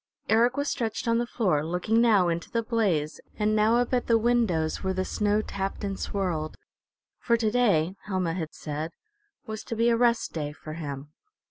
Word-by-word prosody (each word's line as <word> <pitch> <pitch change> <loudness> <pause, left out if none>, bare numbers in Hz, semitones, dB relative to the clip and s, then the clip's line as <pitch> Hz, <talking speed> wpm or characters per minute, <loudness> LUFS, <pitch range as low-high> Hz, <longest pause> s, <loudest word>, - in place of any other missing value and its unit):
Eric 235 +4 +3
was 285 0 0
stretched 235 -1 -2
on 230 0 +3
the 240 - -1
floor, 185 -12 +1
looking 180 +8 +1
now 210 -6 +4
into 170 -1 -2
the 230 -1 -1
blaze, 195 -10 0 0.2
and 215 0 +1
now 215 +2 +4
up 245 +1 0
at 245 - +1
the 230 - +5
windows 220 -10 +1
where 190 0 -1
the 185 0 -1
snow 210 +2 +1
tapped 195 0 -4
and 195 -1 -3
swirled; 175 -6 -2 0.6
for 235 -2 +2
to 220 -2 0
day, 195 -8 +2
Helma 185 -4 -1
had 165 -3 -4
said, 155 +2 -5 0.5
was 220 0 -6
to 230 - -4
be 230 +1 +3
a 235 - +4
rest 235 0 +2
day 150 -2 -3
for 155 +1 -9
him. 145 -3 -6
205 Hz, 195 wpm, -27 LUFS, 165-230 Hz, 0.6 s, the